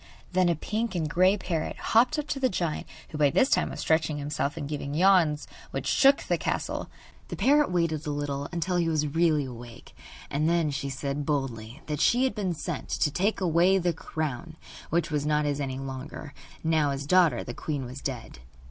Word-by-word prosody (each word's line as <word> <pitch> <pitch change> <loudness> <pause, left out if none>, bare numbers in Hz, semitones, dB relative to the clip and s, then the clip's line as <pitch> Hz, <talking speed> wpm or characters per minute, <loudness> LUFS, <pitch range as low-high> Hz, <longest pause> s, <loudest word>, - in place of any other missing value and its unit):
Then 185 -1 +3
a 170 - +2
pink 215 +6 -3
and 160 -3 0
grey 185 +5 +3
parrot 170 -5 -3
hopped 245 +7 +3
up 300 - -2
to 275 - -1
the 260 -1 +2
giant, 170 -6 -2 0.2
who 150 - -6
by 145 -1 +5
this 255 - +2
time - - +2
was - - -6
stretching 160 -2 +1
himself 145 +1 -2
and 145 -3 -4
giving 145 -1 -4
yawns 170 -4 +4 0.2
which - - -4
shook 275 0 +4
the - - 0
castle. - - -2 0.4
The - - -5
parrot 295 +2 +3
waited 165 -3 0
a - - -1
little, 145 -1 -3
until 175 +1 -1
he 170 -1 +1
was 155 -2 +1
really 155 -1 +2
awake, 120 -2 -11 0.4
and 150 +3 +1
then 170 -3 +2
she 140 0 -3
said 140 +2 -3
boldly 135 -3 -3
that 150 -2 -3
she 245 +2 +4
had 265 - +1
been 190 -5 -2
sent - - -5
to 150 - +1
take 195 +7 0
away 180 +2 +4
the 175 -2 +1
crown, 155 0 -4 0.3
which 165 -1 0
was 150 -1 0
not 150 0 +1
his 145 0 -1
any 130 -2 -3
longer, 135 +2 -7 0.3
now 160 -2 +2
his 140 0 -3
daughter 180 +1 +4
the 120 - -6
queen 145 0 -4
was 130 +3 -8
dead. 125 - -5
155 Hz, 200 wpm, -27 LUFS, 145-175 Hz, 0.4 s, by